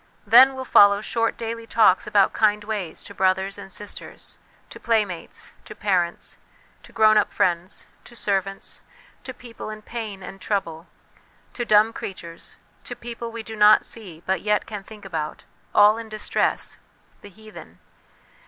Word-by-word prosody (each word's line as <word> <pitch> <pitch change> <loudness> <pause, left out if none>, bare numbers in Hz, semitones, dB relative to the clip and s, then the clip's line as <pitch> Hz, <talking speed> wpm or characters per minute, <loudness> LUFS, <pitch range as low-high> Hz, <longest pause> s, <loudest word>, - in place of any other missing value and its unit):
Then 255 +5 +7
will 260 0 -6
follow 200 -4 +6
short 230 +1 -1
daily 230 0 -5
talks 215 -6 +3
about 200 -2 +3
kind 210 -1 +2
ways, 205 -6 -5
to - - -10
brothers 190 +1 0
and 195 - -10
sisters, 205 +2 -8 0.3
to - - -10
playmates, 210 -7 -2
to - - -10
parents, 180 -4 -1 0.4
to - - -17
grown 215 -1 +5
up 210 - -1
friends, 175 +1 -1 0.2
to 240 - -14
servants, 195 -3 -3 0.4
to 260 - -6
people 240 -3 -10
in 215 0 -8
pain 215 -5 -6
and 190 +1 -10
trouble, 170 -5 -3 0.7
to 240 - -3
dumb 215 +1 +4
creatures, 170 -5 -9 0.3
to - - -6
people 235 0 -7
we 230 0 -7
do 220 0 -8
not 210 0 +6
see 180 -8 -6
but 190 0 0
yet 210 0 +1
can 210 -3 -7
think 210 0 -13
about 160 -5 -5 0.3
all 210 +2 +5
in 225 -1 -9
distress, 215 -1 -1 0.4
the 205 - -12
heathen. 215 +2 -14
210 Hz, 155 wpm, -23 LUFS, 190-225 Hz, 0.7 s, Then